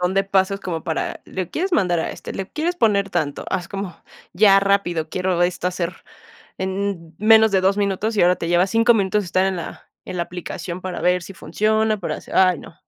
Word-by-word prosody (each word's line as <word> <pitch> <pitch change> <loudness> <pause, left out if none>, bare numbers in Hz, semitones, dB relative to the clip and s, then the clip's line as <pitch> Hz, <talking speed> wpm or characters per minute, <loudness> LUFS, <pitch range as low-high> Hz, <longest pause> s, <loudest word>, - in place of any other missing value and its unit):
montón 180 +1 0
de 195 - +3
pasos 195 0 +1
como 165 -4 -4
para, 160 - -3
¿le 185 -3 -5
quieres 370 +3 -2
mandar 180 - +2
a - - -2
este?, - - -8
¿le 195 0 -5
quieres 340 +3 -2
poner 200 - +2
tanto?, 145 -2 -2
haz 180 -3 -2
como 195 -2 -5 0.4
ya 195 +1 +5
rápido, 185 -5 0
quiero 180 0 0
esto 180 0 0
hacer 180 -1 -2 0.6
en 190 -3 -3
menos 220 +1 +6
de 190 - +3
2 195 +1 +2
minutos, 205 +2 -1
y - - +4
ahora 180 +1 +5
te 165 - -4
lleva 175 +2 +3
5 230 +4 +4
minutos 205 -1 +1
estar 185 +2 +1
en 190 - 0
la 170 - -8 0.2
en 185 - -6
la 170 - 0
aplicación 180 0 -6
para 185 -1 -5
ver 180 0 +2
si 195 - -10
funciona, 215 +7 0
para 180 - -3
hacer, - - -10
ay 185 -3 +4
no, 165 - -12
190 Hz, 215 wpm, -21 LUFS, 175-200 Hz, 0.6 s, menos